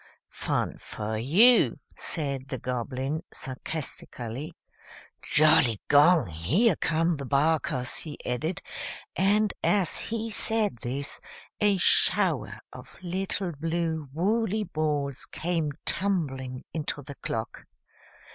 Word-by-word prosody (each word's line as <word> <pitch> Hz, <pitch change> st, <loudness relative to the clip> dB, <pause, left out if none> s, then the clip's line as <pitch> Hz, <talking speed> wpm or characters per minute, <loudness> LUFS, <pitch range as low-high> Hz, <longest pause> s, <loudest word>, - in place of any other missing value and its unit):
Fun -, -, -2 dB
for 110 Hz, +1 st, -5 dB
you," 205 Hz, -, +5 dB, 0.2 s
said 140 Hz, -5 st, -3 dB
the 135 Hz, -3 st, -4 dB
Goblin, 130 Hz, +5 st, -3 dB
sarcastically. 130 Hz, -2 st, -5 dB, 0.7 s
"Jolligong! 150 Hz, -, +5 dB
Here 95 Hz, -, +2 dB
come 165 Hz, 0 st, +1 dB
the 140 Hz, -, -5 dB
Barkers!" 140 Hz, -3 st, +1 dB
he 150 Hz, -3 st, -6 dB
added, 155 Hz, +8 st, -2 dB, 0.5 s
and, 205 Hz, +2 st, +3 dB
as 195 Hz, -5 st, +2 dB
he 225 Hz, 0 st, -3 dB
said 215 Hz, -, +1 dB
this, 135 Hz, +5 st, -4 dB, 0.4 s
a 205 Hz, -2 st, +3 dB
shower 180 Hz, -, +3 dB
of -, -, -12 dB
little 185 Hz, +1 st, -2 dB
blue 160 Hz, -1 st, -2 dB
woolly 215 Hz, +6 st, +1 dB
balls 150 Hz, -6 st, -2 dB
came 165 Hz, -3 st, -1 dB
tumbling 135 Hz, -9 st, -1 dB
into 150 Hz, -2 st, -3 dB
the 140 Hz, +2 st, -8 dB
clock. 110 Hz, 0 st, -4 dB
155 Hz, 100 wpm, -27 LUFS, 135-185 Hz, 0.7 s, you